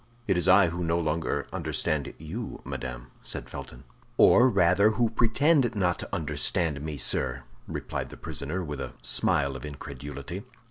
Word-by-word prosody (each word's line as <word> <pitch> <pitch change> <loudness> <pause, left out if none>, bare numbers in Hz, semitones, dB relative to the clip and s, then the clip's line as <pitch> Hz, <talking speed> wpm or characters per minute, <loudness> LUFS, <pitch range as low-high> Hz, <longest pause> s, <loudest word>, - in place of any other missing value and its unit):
"It - - +2
is 90 - +2
I 95 -1 +7
who 85 +2 -3
no 85 0 +1
longer 75 -3 -1
understand 75 -3 -1
you, 95 +10 -6
madame," 65 -1 -6
said - - -2
Felton. - - -8 0.3
"Or, 130 +2 +7
rather, 95 0 +4
who 115 -2 +2
pretend 120 +2 +3
not 90 -4 +1
to - - -6
understand 75 0 0
me, 75 -1 -4
sir!" 65 -1 +1 0.2
replied - - -4
the - - -11
prisoner, 80 +7 -4
with 75 -4 -5
a - - -5
smile 70 +3 +1
of 65 - -7
incredulity. 70 +3 -7
80 Hz, 155 wpm, -28 LUFS, 70-95 Hz, 0.3 s, I